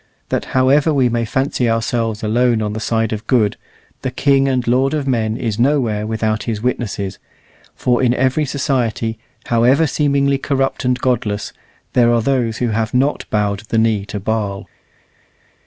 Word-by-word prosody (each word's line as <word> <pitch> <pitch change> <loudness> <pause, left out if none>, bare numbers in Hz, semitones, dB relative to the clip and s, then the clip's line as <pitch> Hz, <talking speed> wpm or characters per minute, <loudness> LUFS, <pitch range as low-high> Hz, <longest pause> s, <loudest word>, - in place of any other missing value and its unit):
that - - -1
however 140 +4 +4
we 135 -4 +2
may 120 0 0
fancy 125 +1 0
ourselves 115 -1 -1
alone 120 +2 +2
on 105 -1 -2
the 110 - -4
side 115 0 0
of 110 +1 -6
good, 110 -6 +2 0.5
the 130 - -2
King 135 +1 +2
and 130 -2 0
Lord 130 +4 +2
of 145 -2 -2
men 115 -3 0
is 115 -3 -3
nowhere 120 -6 +1
without 110 -1 -1
His 115 -3 -2
witnesses; 105 -5 -3 0.6
for 125 0 +1
in 125 -2 +3
every 130 +4 +1
society, 125 -5 -1 0.3
however 125 +7 +3
seemingly 140 -1 +1
corrupt 135 -1 -1
and 125 0 +2
godless, 120 -5 -1 0.4
there 120 -1 +4
are 115 -1 +2
those 120 -4 0
who 120 - 0
have 110 +2 -1
not 135 +3 +1
bowed 105 -2 0
the 115 - 0
knee 110 -2 +2
to 105 - -4
Baal. 100 -1 -2
120 Hz, 165 wpm, -18 LUFS, 110-130 Hz, 0.6 s, however